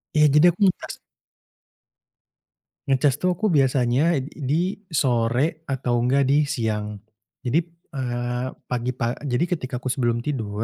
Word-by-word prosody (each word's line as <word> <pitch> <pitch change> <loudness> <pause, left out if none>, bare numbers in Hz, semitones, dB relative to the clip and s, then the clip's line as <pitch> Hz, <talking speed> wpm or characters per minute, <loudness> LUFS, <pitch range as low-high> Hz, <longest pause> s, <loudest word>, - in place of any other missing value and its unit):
Iya, 150 - +6
jadi 150 +3 +7
aku 180 - -17
ngecas 185 - -2 2.0
Ngecas 135 +1 +2
tuh 180 -1 +1
aku 215 - -2
biasanya 135 +3 +3
ed 135 +2 -5
di 160 +7 -1 0.2
sore 135 +2 +1
atau 125 -3 0
enggak 135 +3 +2
di 145 +2 +2
siang. 105 -5 -2 0.5
Jadi, 135 +7 +3
p 165 - -17 0.2
eee, 120 -1 -2 0.2
pagi-pa 120 -1 -2
jadi 140 +2 0
ketika 150 -8 -3
aku 130 - -13
sebelum 120 -3 0
tidur 110 -7 -2
130 Hz, 135 wpm, -23 LUFS, 120-150 Hz, 2.0 s, jadi